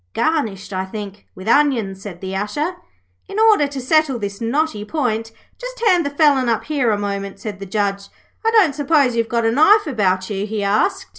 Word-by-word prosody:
'Garnished, 225 Hz, -12 st, -1 dB
I 185 Hz, 0 st, -1 dB
think, 205 Hz, 0 st, -8 dB
with 185 Hz, +3 st, -10 dB
onions,' 230 Hz, -8 st, +2 dB
said 190 Hz, -4 st, -9 dB
the 190 Hz, 0 st, -5 dB
Usher. 290 Hz, -, -2 dB, 0.5 s
'In 395 Hz, -, -7 dB
order 435 Hz, -9 st, +4 dB
to 280 Hz, -1 st, -6 dB
settle 285 Hz, 0 st, +2 dB
this 200 Hz, -1 st, -6 dB
knotty 235 Hz, -2 st, -1 dB
point, 225 Hz, -4 st, -2 dB, 0.3 s
just -, -, -7 dB
hand 360 Hz, -5 st, +4 dB
the -, -, -1 dB
felon 285 Hz, -4 st, +3 dB
up 225 Hz, -, 0 dB
here 285 Hz, -6 st, 0 dB
a 210 Hz, -, +1 dB
moment,' 200 Hz, -1 st, -4 dB
said 205 Hz, -2 st, -6 dB
the 195 Hz, -, -7 dB
Judge. 200 Hz, 0 st, -2 dB, 0.4 s
'I 450 Hz, -, +3 dB
don't 425 Hz, -10 st, +4 dB
suppose 280 Hz, -3 st, +2 dB
you've 230 Hz, -1 st, 0 dB
got 235 Hz, -1 st, 0 dB
a 225 Hz, -, +3 dB
knife 400 Hz, -, +5 dB
about 190 Hz, -, 0 dB
you?' 200 Hz, +1 st, -2 dB
he 215 Hz, -1 st, -3 dB
asked. 210 Hz, -, +1 dB
230 Hz, 200 wpm, -19 LUFS, 200-300 Hz, 0.5 s, knife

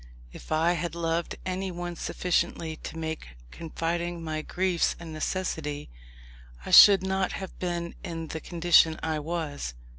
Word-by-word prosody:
If -, -, -12 dB
I 160 Hz, +2 st, +3 dB
had 170 Hz, -1 st, -3 dB
loved 165 Hz, 0 st, -1 dB
anyone 180 Hz, -2 st, -3 dB
sufficiently 170 Hz, -2 st, -1 dB
to 160 Hz, -, -8 dB
make 160 Hz, -, -5 dB
confiding 170 Hz, +1 st, -3 dB
my 155 Hz, -1 st, -3 dB
griefs 180 Hz, +1 st, 0 dB
a 170 Hz, -, -9 dB
necessity, 155 Hz, -, -3 dB, 0.7 s
I -, -, -5 dB
should 200 Hz, -2 st, +10 dB
not 190 Hz, -1 st, 0 dB
have 190 Hz, -, -7 dB
been 175 Hz, -1 st, -3 dB
in 165 Hz, -2 st, -5 dB
the 160 Hz, -, -4 dB
condition 170 Hz, -1 st, +4 dB
I 160 Hz, -1 st, -1 dB
was. 150 Hz, -, -4 dB
170 Hz, 140 wpm, -27 LUFS, 160-175 Hz, 0.7 s, should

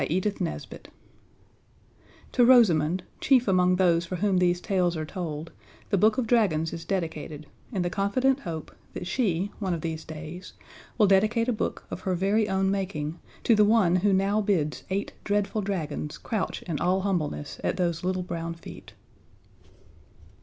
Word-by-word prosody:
PAGE 175 Hz, +8 st, 0 dB
153 195 Hz, -5 st, -4 dB, 1.4 s
_To 245 Hz, -2 st, +5 dB
Rosamund, 180 Hz, -9 st, +5 dB, 0.2 s
chief 255 Hz, -4 st, +3 dB
among 180 Hz, -1 st, +4 dB
those 175 Hz, -2 st, +3 dB
for 170 Hz, +2 st, -5 dB
whom 190 Hz, 0 st, +1 dB
these 175 Hz, -1 st, +2 dB
tales 180 Hz, -3 st, 0 dB
are 155 Hz, -, -3 dB
told, 160 Hz, -2 st, -5 dB, 0.4 s
The 200 Hz, -, +3 dB
Book 215 Hz, +5 st, +4 dB
of 255 Hz, -, +1 dB
Dragons 190 Hz, -9 st, +2 dB
is 165 Hz, 0 st, -6 dB
dedicated 160 Hz, -4 st, -3 dB, 0.3 s
in 190 Hz, -6 st, -1 dB
the 175 Hz, -, 0 dB
confident 255 Hz, +8 st, +1 dB
hope 165 Hz, -, -6 dB, 0.2 s
that -, -, -5 dB
she, 195 Hz, -2 st, 0 dB
one 190 Hz, -4 st, -1 dB
of 165 Hz, -, -6 dB
these 160 Hz, -1 st, -4 dB
days, 160 Hz, +4 st, -8 dB, 0.4 s
will 215 Hz, -, +5 dB
dedicate 215 Hz, +4 st, +3 dB
a 250 Hz, -, +2 dB
book 215 Hz, -, -3 dB
of -, -, -4 dB
her 185 Hz, -1 st, -1 dB
very 200 Hz, +4 st, +1 dB
own 190 Hz, 0 st, +1 dB
making 175 Hz, -5 st, -3 dB, 0.2 s
to 235 Hz, -, +4 dB
the 210 Hz, -1 st, +5 dB
one 205 Hz, -5 st, +4 dB
who 200 Hz, +3 st, +2 dB
now 195 Hz, +2 st, +2 dB
bids 170 Hz, -8 st, 0 dB
eight 195 Hz, +2 st, -2 dB
dreadful 205 Hz, +1 st, 0 dB
dragons 155 Hz, -6 st, -3 dB
crouch 215 Hz, -5 st, -3 dB
in 165 Hz, -5 st, -3 dB
all 185 Hz, +2 st, +2 dB
humbleness 160 Hz, -7 st, -2 dB
at -, -, 0 dB
those 170 Hz, -2 st, -1 dB
little 185 Hz, 0 st, -1 dB
brown 165 Hz, -1 st, -4 dB
feet. 170 Hz, -, -12 dB
185 Hz, 165 wpm, -27 LUFS, 165-205 Hz, 1.4 s, To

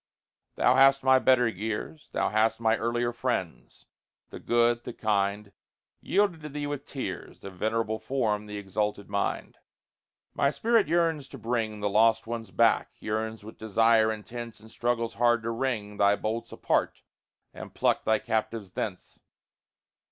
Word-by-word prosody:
Thou 125 Hz, -, +4 dB
hast 135 Hz, +1 st, +5 dB
my 130 Hz, 0 st, +5 dB
better 130 Hz, -2 st, +4 dB
years, 110 Hz, -, -5 dB
Thou -, -, 0 dB
hast 110 Hz, +1 st, +2 dB
my 110 Hz, -1 st, +3 dB
earlier 120 Hz, +2 st, -1 dB
friends 60 Hz, -, -4 dB, 0.5 s
the -, -, -8 dB
good, 120 Hz, 0 st, +2 dB
the -, -, -6 dB
kind 100 Hz, -1 st, -1 dB, 0.5 s
Yielded 195 Hz, -5 st, +1 dB
to 150 Hz, -, -7 dB
thee 145 Hz, 0 st, -4 dB
with 145 Hz, -1 st, -4 dB
tears 100 Hz, -10 st, -6 dB
The 100 Hz, -, -8 dB
venerable 110 Hz, +3 st, -1 dB
form, 110 Hz, -3 st, -1 dB
the 105 Hz, 0 st, -6 dB
exalted 100 Hz, +1 st, -3 dB
mind. 100 Hz, 0 st, -2 dB, 0.7 s
My 140 Hz, -, +2 dB
spirit 230 Hz, +7 st, +2 dB
yearns 165 Hz, -3 st, +1 dB
to 135 Hz, -, -10 dB
bring 110 Hz, -2 st, -2 dB
The 105 Hz, -, +1 dB
lost 115 Hz, +2 st, +4 dB
ones 115 Hz, -2 st, -5 dB
back; 115 Hz, +2 st, +3 dB
yearns 110 Hz, 0 st, -3 dB
with 110 Hz, -, -11 dB
desire 110 Hz, +1 st, +3 dB
intense, 115 Hz, +2 st, -7 dB
And 110 Hz, +1 st, -16 dB
struggles 115 Hz, -1 st, -1 dB
hard 120 Hz, -1 st, +2 dB
to 115 Hz, -, -2 dB
wring 115 Hz, -4 st, -3 dB
Thy 100 Hz, 0 st, +4 dB
bolts 115 Hz, +2 st, -4 dB
apart, -, -, -1 dB, 0.5 s
and -, -, -9 dB
pluck -, -, +1 dB
thy 110 Hz, -, +3 dB
captives 110 Hz, -3 st, -3 dB
thence. 95 Hz, -2 st, -5 dB
115 Hz, 150 wpm, -28 LUFS, 105-120 Hz, 0.7 s, hast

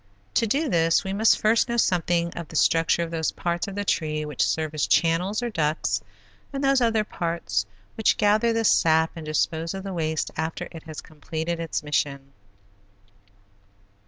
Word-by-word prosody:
To 230 Hz, -, +2 dB
do 285 Hz, +8 st, +1 dB
this 165 Hz, -6 st, +2 dB
we 190 Hz, -1 st, -3 dB
must 220 Hz, +3 st, +4 dB
first 225 Hz, +3 st, +3 dB
know 235 Hz, -, -1 dB
something 175 Hz, -4 st, +1 dB
of 170 Hz, -2 st, -6 dB
the -, -, -11 dB
structure 165 Hz, +1 st, +3 dB
of 165 Hz, -, -6 dB
those 160 Hz, -1 st, -1 dB
parts 175 Hz, +1 st, -2 dB
of 195 Hz, -, -6 dB
the 205 Hz, 0 st, -3 dB
tree 155 Hz, -4 st, -1 dB
which 150 Hz, -3 st, -4 dB
serve 155 Hz, -1 st, 0 dB
as 155 Hz, -, 0 dB
channels, 180 Hz, +7 st, +2 dB
or 240 Hz, -, -2 dB
ducts, 155 Hz, -4 st, 0 dB, 0.5 s
and 275 Hz, 0 st, -4 dB
those 275 Hz, -1 st, +3 dB
other 225 Hz, -2 st, +2 dB
parts 165 Hz, -, -2 dB, 0.3 s
which 220 Hz, -, +2 dB
gather 215 Hz, +3 st, +3 dB
the 225 Hz, 0 st, 0 dB
sap 160 Hz, -4 st, +4 dB
and 160 Hz, -2 st, -8 dB
dispose 160 Hz, +3 st, -1 dB
of 190 Hz, -, -6 dB
the 195 Hz, -1 st, -5 dB
waste 160 Hz, -2 st, -2 dB
after 160 Hz, +2 st, -3 dB
it 165 Hz, -, -9 dB
has 155 Hz, -1 st, -7 dB
completed 160 Hz, +2 st, -5 dB
its 165 Hz, -2 st, -3 dB
mission. 140 Hz, -2 st, -2 dB
170 Hz, 180 wpm, -25 LUFS, 160-205 Hz, 0.5 s, must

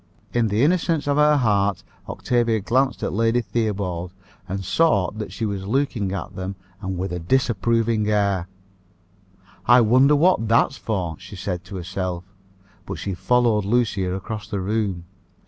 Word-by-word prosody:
In 120 Hz, -2 st, +2 dB
the 105 Hz, +4 st, +1 dB
innocence 165 Hz, -1 st, +1 dB
of 145 Hz, 0 st, +1 dB
her 150 Hz, 0 st, +5 dB
heart 100 Hz, -6 st, +1 dB, 0.3 s
Octavia 120 Hz, -2 st, 0 dB
glanced 130 Hz, +6 st, 0 dB
at -, -, -2 dB
Lady 115 Hz, +3 st, +2 dB
Theobald, 100 Hz, -7 st, -2 dB, 0.4 s
and 95 Hz, 0 st, -4 dB
saw 100 Hz, -, +2 dB
that 105 Hz, 0 st, -6 dB
she 115 Hz, -, -3 dB
was 100 Hz, -2 st, -4 dB
looking 115 Hz, -5 st, 0 dB
at 95 Hz, 0 st, -5 dB
them, 95 Hz, +1 st, -5 dB, 0.3 s
and 95 Hz, -2 st, -4 dB
with 95 Hz, 0 st, -3 dB
a 90 Hz, -, -3 dB
disapproving 115 Hz, +1 st, +1 dB
air. 100 Hz, -4 st, +1 dB, 1.2 s
"I 120 Hz, 0 st, +7 dB
wonder 130 Hz, +6 st, +5 dB
what 155 Hz, -6 st, +3 dB
that's 115 Hz, +4 st, +3 dB
for?" 90 Hz, -8 st, -3 dB
she 95 Hz, +2 st, -11 dB
said 90 Hz, -2 st, -4 dB
to 100 Hz, -, -9 dB
herself; 90 Hz, -1 st, -4 dB, 0.6 s
but -, -, -4 dB
she 100 Hz, -, -4 dB
followed 110 Hz, +3 st, +2 dB
Lucia 100 Hz, -4 st, 0 dB
across 105 Hz, +2 st, -6 dB
the 100 Hz, -, -3 dB
room. 95 Hz, -3 st, -2 dB
105 Hz, 155 wpm, -22 LUFS, 95-120 Hz, 1.2 s, I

